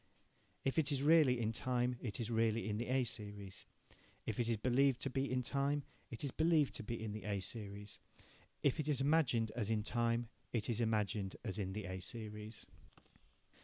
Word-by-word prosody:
If 135 +4 +2
it 155 -1 +1
is 140 -1 +1
really 150 -5 +6
in 110 -1 +1
time, 125 +1 0
it 110 -3 -4
is 115 0 -1
really 115 0 +2
in 105 0 -1
the 120 - -2
A 130 +1 +3
series. 105 -4 -5 0.6
If 110 - -2
it 120 -1 +1
is 115 - +2
believed 130 +3 +3
to 135 - 0
be 135 +1 0
in 130 0 +1
time, 140 +3 +1 0.3
it 115 - -6
is 140 - -1
believed 160 -2 +3
to 120 - -6
be 115 +2 -3
in 110 - -3
the 105 +1 -6
A 100 -2 0
series. 100 0 -5 0.6
If 140 +1 +3
it 155 - -1
is 150 -3 +2
imagined 135 -6 +3
as 110 -4 -1
in 110 -1 +1
times 120 +1 +1 0.3
it 115 -1 0
is 115 +1 0
imagined 105 -3 0
as 105 -2 -3
in 95 -2 -2
the 105 0 -4
A 95 0 -4
series. 105 +1 -6
115 Hz, 200 wpm, -37 LUFS, 105-135 Hz, 0.6 s, really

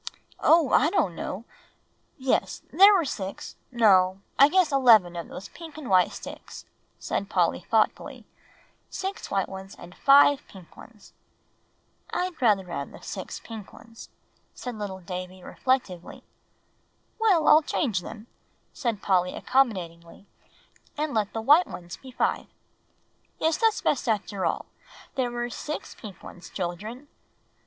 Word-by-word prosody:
"Oh! 320 -5 +4
I 295 - +4
don't 205 - +1
know 205 +5 -5 0.7
yes, 265 -2 -1
there 395 +2 +8
were 375 -6 +3
six 195 -7 -6 0.2
no, 190 -6 +4 0.2
I 280 +2 +8
guess 365 -1 +3
eleven 225 -10 +5
of 170 - -5
those 195 - -9
pink 325 -2 -11
and 275 -9 -6
white 185 -1 +4
sticks," - - -10 0.3
said 200 - -3
Polly 175 -2 +1
thoughtfully; 215 +5 -1 0.6
"six 385 +1 -5
white 195 -1 0
ones 190 0 -9
and 175 +1 -12
five 280 +3 +5
pink 185 -4 -15
ones." 220 -4 -16 1.0
"I'd 360 -4 -3
rather 205 -6 +3
have 155 -6 -5
had - - -14
six 190 -3 -6
pink 220 -4 -9
ones," 230 0 -13 0.5
said 250 - -6
little 200 -3 -6
Davie 180 +1 -7
reflectively. 225 -10 -2 1.0
"Well, 400 -8 +3
I'll 305 - +8
change 235 - -1
them," 220 +4 -9 0.5
said 230 -6 -3
Polly 180 -2 +1
accommodatingly, 185 -9 -1 0.7
"and 300 0 -2
let 215 -3 0
the 225 - -4
white 295 +10 +5
ones 175 -1 -9
be 265 - -13
five. 255 - -1 0.9
Yes, 320 0 +1
that's 450 -2 +2
best 245 - 0
after 200 -4 -1
all, - - -2 0.5
there 255 -2 -1
were 240 0 -4
six 305 +5 -6
pink 200 -5 -12
ones, 175 -1 -11
children. 210 +9 -5
220 Hz, 140 wpm, -26 LUFS, 185-275 Hz, 1.0 s, there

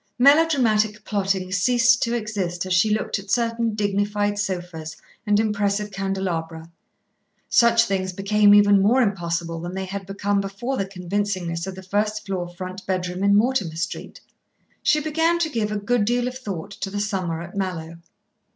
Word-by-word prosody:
Melodramatic 245 -7 +3
plotting 195 -2 -1
ceased 240 +5 +3
to 235 0 0
exist 195 -6 -3
as 185 - -1
she 180 +5 +4
looked 215 -1 -1
at 195 0 -12
certain 230 -1 0
dignified 205 0 0
sofas 175 -5 -4 0.3
and 205 0 +3
impressive 210 -1 0
candelabra. 175 -4 -3 0.8
Such 235 -1 +5
things 190 -3 -1
became 205 +2 +4
even 205 -1 +6
more 240 +6 +4
impossible 170 -4 -2
than 175 +2 -6
they 190 0 -3
had 195 0 -6
become 200 0 0
before 200 +7 -4
the 195 -6 -2
convincingness 185 -2 -3
of 190 - -5
the 190 - -10
first 210 +3 -1
floor 185 -3 -3
front 185 +2 -7
bedroom 185 0 -2
in 200 0 +4
Mortimer 210 -7 +1
Street, 170 +2 -5 0.6
She 300 - +3
began 325 +3 +1
to 330 -2 -1
give 220 -4 -1
a 210 - -1
good 215 +1 +1
deal 245 +2 +1
of 250 - -5
thought 200 -7 -6
to 195 -1 -5
the 205 +1 -4
summer 190 -6 -2
at 175 +2 -11
Mallowe. 170 -4 -4
200 Hz, 165 wpm, -23 LUFS, 185-215 Hz, 0.8 s, even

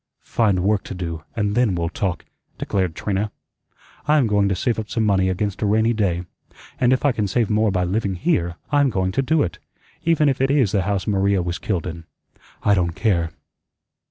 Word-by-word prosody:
"Find 100 -6 +1
work 100 0 +1
to - - -6
do, 85 -3 -5
and 105 -2 0
then 120 -5 +2
we'll 85 -1 -1
talk," 95 -2 -3 0.3
declared 95 -5 -1
Trina. 105 +1 -2 0.8
"I'M 150 -3 +4
going 105 -2 +2
to 95 - +1
save 115 +6 0
up 110 - -5
some 115 -2 0
money 95 -2 +2
against 95 +1 -2
a 105 - +1
rainy 110 +3 +3
day; 90 -6 0 0.6
and 125 -1 +3
if 130 +2 +1
I 145 - +5
can 110 -4 -1
save 110 +2 0
more 110 +1 +3
by 90 -1 0
living 95 +1 -1
here 85 - 0 0.2
I'm 145 -2 +4
going 95 -4 0
to 135 - +1
do 150 +3 +2
it, 85 - -4 0.4
even 160 -2 +3
if 135 -2 +1
it 135 - +2
is 135 -8 +3
the 100 - +2
house 95 -1 -1
Maria 100 -2 +1
was 85 0 -3
killed 95 -6 -2
in. 85 -2 -6 0.6
I 105 - +4
don't 85 -4 +1
care." 90 -7 +1
100 Hz, 205 wpm, -22 LUFS, 90-115 Hz, 0.8 s, I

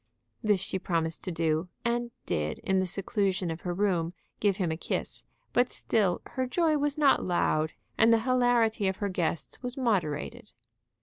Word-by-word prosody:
This 210 -3 +3
she 190 0 -3
promised 165 -3 -1
to 185 - -2
do, 165 +1 0 0.2
and 240 0 0 0.2
did, 75 0 -1
in 190 0 +2
the 185 - 0
seclusion 195 -1 0
of 165 - -6
her 180 - -3
room, 175 -3 +1 0.3
give 200 -2 +2
him 180 -5 0
a - - -1
kiss. 160 - -3 0.3
But 245 0 +3
still 200 -6 +1
her 260 -1 -3
joy 310 +2 +2
was 290 +1 0
not 290 -3 +4
loud, 160 -3 +1 0.3
and 225 +1 +6
the 230 -1 +4
hilarity 240 -4 +2
of 190 0 -1
her 205 - -1
guests 170 -3 -2
was 250 0 -5
moderated. 175 - -1
195 Hz, 175 wpm, -29 LUFS, 170-240 Hz, 0.3 s, and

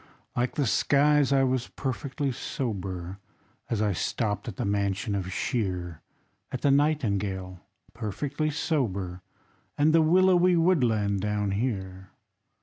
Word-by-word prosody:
Like 125 +1 0
the 145 - +1
skies, 145 +6 +3
I 135 -1 +4
was 130 -2 0
perfectly 135 +2 -3
sober, 95 -8 -4 0.5
As 110 -2 0
I 105 -2 +1
stopped 105 +3 -2
at 110 - -5
the - - -3
mansion 100 +2 -1
of 95 -2 -3
Shear, 90 -7 -2 0.5
At 130 - -4
the 140 - +3
Nightingale, 100 - 0 0.3
perfectly 145 +8 -2
sober, 100 - -2 0.6
And 150 +2 +4
the 165 - +6
willowy 180 +2 +4
woodland 120 - +2
down 105 -1 -1
here. 95 -4 -3
115 Hz, 125 wpm, -27 LUFS, 95-145 Hz, 0.6 s, the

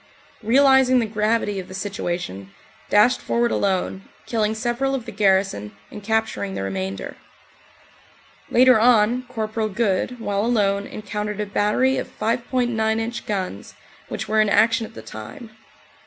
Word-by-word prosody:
realising 265 +2 +5
the 235 - +2
gravity 210 -1 0
of 185 - -7
the 185 - -9
situation, 175 - -4 0.4
dashed 210 +5 +4
forward 235 0 0
alone, 190 -1 -1 0.2
killing 220 -2 0
several 245 +4 -1
of 250 -4 -5
the 230 - -7
garrison 190 - +1
and 210 - -8
capturing 220 -2 -1
the - - -3
remainder. 95 0 -4 1.3
Later 255 -1 +5
on, 240 +1 +3
Cpl. 220 -2 -2
Good, 230 +2 0
while 205 -2 -1
alone, 200 -4 +1
encountered 210 0 -5
a 210 - -1
battery 210 +6 +1
of - - -4
5.9 230 -1 0
inch 230 +2 -4
guns, 185 - -4 0.3
which - - -4
were 215 0 +3
in 215 - +2
action 225 +2 +3
at 225 - -19
the - - -9
time. 110 - -10
215 Hz, 140 wpm, -22 LUFS, 200-235 Hz, 1.3 s, realising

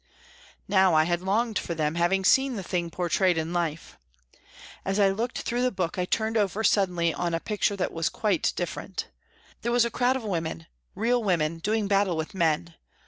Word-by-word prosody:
Now 190 -3 +4
I 155 - +5
had 175 +1 -1
longed 215 +3 0
for 170 - -4
them, 155 -1 0
having 175 +3 +1
seen 265 +4 +4
the 195 - -4
thing 175 -1 -2
portrayed 180 +1 +1
in 160 +2 -2
life. 165 -2 -3 0.8
As 195 +1 -1
I 200 -1 +5
looked 225 +5 -2
through 240 +1 -1
the 255 - +3
book, 180 -2 -3
I 180 - +1
turned 220 +4 0
over 205 +1 0
suddenly 180 -5 +2
on 170 -1 -1
a - - -1
picture 210 +1 -1
that 185 - -2
was 165 -1 0
quite 205 -6 0
different. 180 +2 -4 0.5
There 235 - -1
was 240 0 +4
a 235 - -2
crowd 250 +2 +2
of 265 - -4
women, 165 - -3 0.3
real 240 +2 +1
women, 165 -4 0
doing 210 +3 0
battle 195 -3 +2
with 160 +5 -4
men. 170 -2 0
190 Hz, 195 wpm, -26 LUFS, 170-215 Hz, 0.8 s, I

